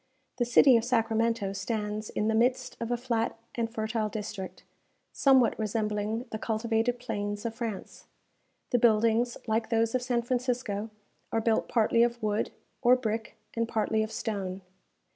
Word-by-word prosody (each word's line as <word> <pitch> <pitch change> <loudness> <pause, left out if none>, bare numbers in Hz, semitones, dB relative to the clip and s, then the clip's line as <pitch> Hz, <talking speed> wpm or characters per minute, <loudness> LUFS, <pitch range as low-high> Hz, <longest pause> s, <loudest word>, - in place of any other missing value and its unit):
The 240 - +3
city 245 +1 +6
of 225 - 0
Sacramento 225 -3 +1
stands 210 +1 -3
in 210 - -1
the 220 - +2
midst 245 +3 +1
of 230 - -3
a 240 - +1
flat 235 -2 -1 0.2
and 230 -1 -2
fertile 220 -1 -1
district, 200 -4 -6 0.5
somewhat 265 -4 +4
resembling 215 +1 -1
the 220 - -4
cultivated 225 +2 0
plains 205 -3 -4
of 230 - -2
France. 225 -5 -6 0.7
The 245 - +3
buildings, 230 +1 +3
like 220 0 0
those 225 0 +2
of 255 - +1
San 245 -1 0
Francisco, 240 -4 -1 0.4
are 225 - +1
built 225 0 +1
partly 230 0 +3
of 240 0 +2
wood, 210 0 0 0.3
or 250 0 +6
brick, 225 -3 -3 0.2
and 230 0 -1
partly 220 -1 0
of 220 0 -2
stone. 195 -5 -3
225 Hz, 155 wpm, -29 LUFS, 215-240 Hz, 0.7 s, city